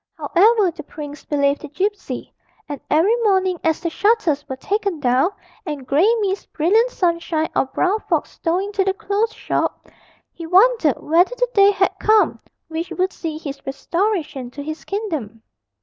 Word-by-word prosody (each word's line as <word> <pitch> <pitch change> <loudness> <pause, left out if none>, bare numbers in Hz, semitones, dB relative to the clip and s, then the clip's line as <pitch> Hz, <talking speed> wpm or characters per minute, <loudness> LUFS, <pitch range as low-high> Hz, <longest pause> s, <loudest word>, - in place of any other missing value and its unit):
However, 410 0 +3
the 330 -1 -9
prince 295 -1 -9
believed 280 -1 +1
the - - -7
gipsy, 395 +8 -3 0.3
and 290 -2 -6
every 340 +10 +4
morning, 380 -6 +1
as 320 0 +1
the 335 -1 -2
shutters 405 -9 +1
were 265 - -3
taken 400 +3 -2
down, 260 +4 +2 0.3
and 295 -7 -5
grey 310 - +3
mist, 395 -1 -2
brilliant 425 +10 +3
sunshine, 335 -5 -1
or - - +3
brown 375 +9 0
fog - - +1
stole 335 +1 -2
into 400 +1 -1
the 385 0 0
close 415 +3 -1
shop, - - -3 0.4
he 335 -1 -8
wondered 375 - +4
whether 350 +9 +2
the - - 0
day 400 -1 +6
had 390 -2 +2
come 430 0 +3 0.3
which 325 +2 -4
would 375 +1 -1
see 320 -2 -5
his 285 -3 -7
restoration 295 - -2
to 285 +3 -8
his 310 -1 -6
kingdom. 305 - -4
345 Hz, 165 wpm, -20 LUFS, 300-405 Hz, 0.4 s, day